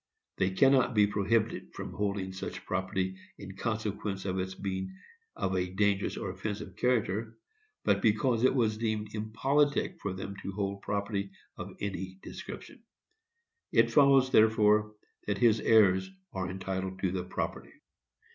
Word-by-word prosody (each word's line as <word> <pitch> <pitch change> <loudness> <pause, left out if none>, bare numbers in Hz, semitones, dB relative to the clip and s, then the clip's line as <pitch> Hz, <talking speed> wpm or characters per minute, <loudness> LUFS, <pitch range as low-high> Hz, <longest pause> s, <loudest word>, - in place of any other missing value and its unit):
They 95 - +2
cannot 130 +4 +4
be 105 -1 +6
prohibited 110 +2 0
from - - -6
holding 100 -2 -2
such 95 - -6
property 95 0 -2 0.2
in 95 -1 -9
consequence 105 -2 -3
of 95 -1 -1
its 95 0 -3
being 95 -1 -4 0.4
of 95 - -1
a 90 0 0
dangerous 100 0 +1
or 95 - -3
offensive 95 0 -5
character, 115 -2 0 0.5
but - - +2
because 115 +2 +2
it 130 - +4
was 110 -4 +1
deemed 110 -2 -2
impolitic 135 +7 +1
for 100 - -2
them 95 +1 -6
to 95 - -5
hold 100 0 -3
property 100 -1 -2 0.3
of - - -8
any 95 -2 -4
description. - - -9 0.9
It - - +4
follows, 135 -2 +5
therefore, 105 -1 +4 0.3
that 100 -1 0
his 110 +1 +4
heirs 95 -5 +4 0.2
are 95 -1 -3
entitled 95 0 -4
to 95 - +1
the 90 -1 -2
property. 90 - -4
100 Hz, 145 wpm, -30 LUFS, 95-110 Hz, 0.9 s, be